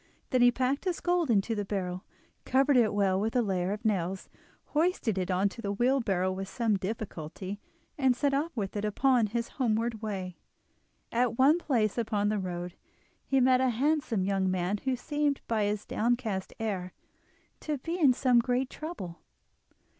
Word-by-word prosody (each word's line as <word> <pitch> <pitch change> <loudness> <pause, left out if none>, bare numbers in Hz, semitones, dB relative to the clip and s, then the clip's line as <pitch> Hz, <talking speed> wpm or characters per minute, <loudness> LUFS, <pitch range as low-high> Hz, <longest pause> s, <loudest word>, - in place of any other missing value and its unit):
Then 255 - +3
he 245 - +8
packed 260 +6 -1
his 360 -2 -1
gold 350 -4 +1
into 220 0 +2
the 205 -2 -2
barrel, 185 -2 -3 0.4
covered 270 +2 +3
it 235 -3 +4
well 195 -2 +2
with 220 +4 -1
a 245 - +3
layer 185 -2 -1
of 210 +3 -5
nails, 190 -3 -1 0.4
hoisted 305 - +1
it 180 - -2
on 185 +2 +2
to 230 - -10
the 200 - -2
wheelbarrow 200 -5 +1
with 190 +1 -5
some 230 -4 +1
difficulty, 190 -1 -5 0.4
and 260 -3 +4
set 280 +3 +1
off 295 +5 0
with 200 -2 -3
it 205 - -2
upon 240 +2 +2
his 235 +2 -2
homeward 230 -3 -1
way. 190 -5 -4 0.7
At 235 -1 +1
one 290 +6 +5
place 235 - 0
upon 210 -3 0
the 210 -1 0
road 180 -1 -4 0.5
he 270 - +3
met 255 0 +4
a 260 - +3
handsome 260 -4 +1
young 190 -1 +1
man 185 +2 0
who 260 -1 +1
seemed 290 +2 -1
by 220 -2 +1
his 205 0 -2
downcast 225 -4 -1
air 190 -5 -3 0.7
to 300 -2 -3
be 330 +7 -4
in 285 -6 +6
some 250 -1 +3
great 250 +2 0
trouble. 250 - -7
225 Hz, 175 wpm, -29 LUFS, 195-260 Hz, 0.7 s, he